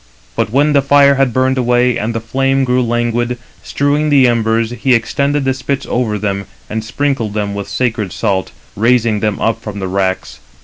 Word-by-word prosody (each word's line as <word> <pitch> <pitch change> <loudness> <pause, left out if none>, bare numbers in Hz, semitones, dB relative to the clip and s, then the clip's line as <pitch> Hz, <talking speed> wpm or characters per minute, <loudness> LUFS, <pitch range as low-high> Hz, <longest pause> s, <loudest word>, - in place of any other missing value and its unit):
But - - 0
when 145 +4 +3
the 140 - +4
fire 140 0 +5
had 135 -2 +1
burned 130 +2 +1
away, 125 0 +2
and 115 +2 -3
the - - 0
flame 135 +4 0
grew 125 0 +1
languid, 120 0 -1 0.2
strewing 145 +2 0
the 140 -3 +5
embers, 115 -1 +1
he 125 +2 +2
extended 140 +4 0
the 135 - +2
spits 135 +1 -3
over 115 -4 -1
them, 100 -1 -3 0.2
and 110 0 -4
sprinkled 125 -3 -2
them 105 -1 -2
with 100 0 -5
sacred 110 -6 -1
salt, 95 -2 -1 0.2
raising 115 -1 +2
them 105 -1 -1
up 115 0 0
from 105 -2 -7
the 95 -1 -3
racks. 95 -6 -2
120 Hz, 185 wpm, -15 LUFS, 110-135 Hz, 0.2 s, fire